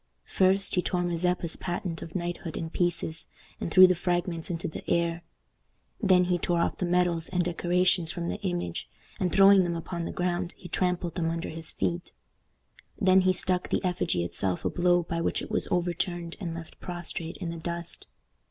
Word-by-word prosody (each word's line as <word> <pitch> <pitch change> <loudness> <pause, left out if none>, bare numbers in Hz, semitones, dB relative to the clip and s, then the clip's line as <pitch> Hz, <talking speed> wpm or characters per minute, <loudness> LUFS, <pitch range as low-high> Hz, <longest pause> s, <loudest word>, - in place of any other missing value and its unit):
First, 190 +1 +2
he 180 - +3
tore 180 0 -1
Mazeppa's 175 -1 0
patent 175 -2 -4
of 165 - -9
knighthood 175 -2 -3
in 160 -1 -4
pieces, 170 -2 -1 0.3
and - - -3
threw 185 +3 +9
the 185 - +5
fragments 175 -1 -2
into 165 -1 -2
the 160 - -7
air. 170 0 +1 0.8
Then 185 -4 +5
he 180 0 +1
tore 175 +1 +1
off 170 - 0
the 180 - -1
medals 175 -2 +1
and 180 -1 +1
decorations 175 -1 +2
from 170 0 -4
the - - -4
image, 175 - -3 0.3
and, 180 -2 0
throwing 195 0 +7
them 170 -1 -1
upon 170 +1 -4
the - - -4
ground, 175 0 -2
he 180 - -10
trampled 180 -2 -1
them 165 -3 -1
under 165 +1 -3
his 160 0 -3
feet. 175 0 -2 0.9
Then 190 -2 +5
he 185 0 +4
struck 185 0 -1
the - - 0
effigy 175 - 0
itself 90 +1 -2
a - - +1
blow 175 0 +3
by 170 0 -3
which - - 0
it - - -7
was - - 0
overturned 175 -1 -1
and 170 -5 -4
left 165 -1 -9
prostrate 175 -1 -4
in 175 -3 -4
the 170 - -6
dust. 170 +1 -6
175 Hz, 190 wpm, -28 LUFS, 170-180 Hz, 0.9 s, threw